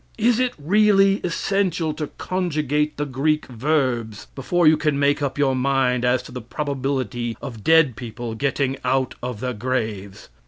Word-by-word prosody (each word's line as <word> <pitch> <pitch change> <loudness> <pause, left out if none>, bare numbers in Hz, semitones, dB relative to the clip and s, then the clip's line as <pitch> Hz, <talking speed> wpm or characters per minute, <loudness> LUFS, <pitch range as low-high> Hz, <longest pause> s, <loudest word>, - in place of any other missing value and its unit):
Is 235 +1 +2
it 250 -1 0
really 195 +4 +4
essential 180 -2 0
to 150 -1 -4
conjugate 150 -5 -1
the 145 - -1
Greek 150 +3 0
verbs 125 -4 -1
before 170 +6 0
you 155 +1 +7
can 150 -2 0
make 140 +1 +2
up 140 -1 -2
your 135 -2 +2
mind 130 -2 +1
as 125 +1 +2
to - - -12
the 125 - -6
probability 130 -3 -3
of 115 -5 -8
dead 160 -6 +4
people 115 +1 -6
getting 135 +2 -1
out 130 0 0
of 125 -4 -5
their 125 -1 -2
graves? 110 -4 -4
140 Hz, 160 wpm, -22 LUFS, 125-155 Hz, -, you